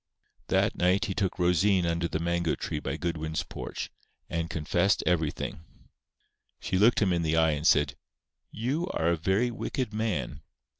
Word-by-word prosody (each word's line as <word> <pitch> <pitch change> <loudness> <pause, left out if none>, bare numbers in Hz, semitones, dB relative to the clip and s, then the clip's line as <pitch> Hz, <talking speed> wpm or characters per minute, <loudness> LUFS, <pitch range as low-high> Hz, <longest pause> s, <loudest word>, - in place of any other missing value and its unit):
That - - +2
night 90 +3 +2
he 100 - -2
took 95 -2 -1
Rosine 90 +1 +3
under 85 0 0
the 80 - -2
mango 85 0 0
tree - - -3
by - - -3
Goodwin's 80 -2 -2
porch, - - -6 0.4
and 85 -1 -2
confessed 85 +5 +1
everything. 80 -2 -1 1.0
She 95 - -1
looked 110 +1 +5
him 95 -3 +2
in 85 - +1
the 80 0 +1
eye, 80 -1 +4
and 75 +2 0
said: 75 -5 +4 0.5
"You 135 - -2
are 80 +1 +2
a 85 - +3
very 95 +9 +1
wicked 120 0 -3
man. 105 -9 -2
85 Hz, 160 wpm, -28 LUFS, 80-100 Hz, 1.0 s, looked